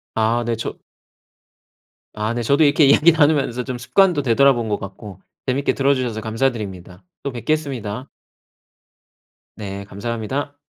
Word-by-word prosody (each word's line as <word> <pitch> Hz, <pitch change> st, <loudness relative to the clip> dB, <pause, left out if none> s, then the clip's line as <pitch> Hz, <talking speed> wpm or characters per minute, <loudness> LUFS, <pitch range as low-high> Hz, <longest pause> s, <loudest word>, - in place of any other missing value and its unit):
아 115 Hz, +2 st, +1 dB
네 115 Hz, 0 st, -1 dB
저 -, -, -6 dB, 1.3 s
아 105 Hz, +2 st, -2 dB
네 120 Hz, -, -2 dB
저도 140 Hz, +6 st, +3 dB
이렇게 145 Hz, +1 st, +4 dB
이야기 150 Hz, +4 st, +6 dB
나누면서 145 Hz, -6 st, +2 dB
좀 125 Hz, -1 st, -5 dB
습관도 150 Hz, +6 st, +2 dB
되돌아본 125 Hz, -1 st, +3 dB
것 105 Hz, -, -1 dB
같고 100 Hz, 0 st, -9 dB, 0.3 s
재밌게 135 Hz, +2 st, +1 dB
들어주셔서 130 Hz, -5 st, 0 dB
감사드립니다. 105 Hz, -6 st, -3 dB, 0.2 s
또 140 Hz, -, -3 dB
뵙겠습니다. 130 Hz, -3 st, -3 dB, 1.5 s
네 100 Hz, -2 st, -6 dB
감사합니다. 115 Hz, +8 st, -4 dB
120 Hz, 305 characters per minute, -20 LUFS, 110-140 Hz, 1.5 s, 이야기